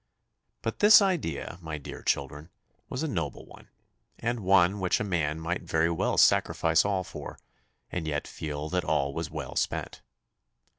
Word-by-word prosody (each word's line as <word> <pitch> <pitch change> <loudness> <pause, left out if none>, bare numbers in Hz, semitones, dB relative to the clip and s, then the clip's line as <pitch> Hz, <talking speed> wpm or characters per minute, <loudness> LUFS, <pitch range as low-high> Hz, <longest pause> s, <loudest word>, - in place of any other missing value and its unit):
But - - -3
this 210 +1 +9
idea, 170 - -1
my 80 -2 -5
dear 70 - -9
children, 70 +3 -2 0.4
was 130 +4 -3
a - - 0
noble 80 - -3
one, - - -16 0.5
and 120 +1 -2
one 95 0 +4
which 90 -1 +1
a - - -1
man 80 -6 -1
might 85 +2 -2
very 85 -1 +1
well 85 - 0
sacrifice 80 0 +4
all 100 -2 0
for, - - -8 0.5
and 85 -3 -3
yet 75 -2 -2
feel 75 -1 -5
that 90 +1 0
all 70 0 0
was 80 0 -3
well 75 -5 -6
spent. - - -2
85 Hz, 160 wpm, -28 LUFS, 75-95 Hz, 0.5 s, this